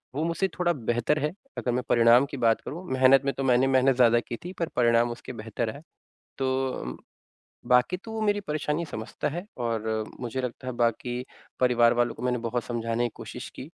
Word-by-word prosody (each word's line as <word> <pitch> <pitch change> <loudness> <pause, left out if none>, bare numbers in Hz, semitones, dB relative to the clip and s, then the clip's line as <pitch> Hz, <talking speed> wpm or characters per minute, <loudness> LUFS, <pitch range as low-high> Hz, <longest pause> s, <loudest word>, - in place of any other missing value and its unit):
वो 150 - 0
मुझसे 170 +3 0
थोड़ा 175 -1 +2
बेहतर 120 +2 0
है 150 +1 0 0.3
अगर 125 - -1
मैं 125 +1 -1
परिणाम 120 +2 +6
की 140 - -5
बात 115 -2 +2
करूँ, 170 +5 -7
मेहनत 130 0 +6
में 140 - +1
तो 135 - -1
मैंने 130 0 +4
मेहनत 130 0 +4
ज़्यादा 120 -2 +5
की 120 - -6
थी 180 - -5
पर 170 - 0
परिणाम 120 -1 +3
उसके 120 +2 -8
बेहतर 115 0 -3
आए। 140 - -10 0.6
तो 130 0 0 0.2
अ, - - -12 0.7
बाक़ी 125 +7 +3
तो 220 +4 -10
वो 220 - -3
मेरी 205 -1 +2
परेशानी 150 -2 -2
समझता 110 -6 -4
है 170 +5 -4
और 115 -2 -2 0.3
मुझे 125 +1 -3
लगता 125 0 -5
है 130 - -2
बाक़ी 120 +1 -1 0.4
परिवार 120 -2 +5
वालों 120 -1 +1
को - - -10
मैंने 125 0 0
बहुत 115 +1 -2
समझाने 115 0 -1
की - - +1
कोशिश - - -8
की, - - -7
125 Hz, 205 wpm, -27 LUFS, 120-140 Hz, 0.7 s, परिणाम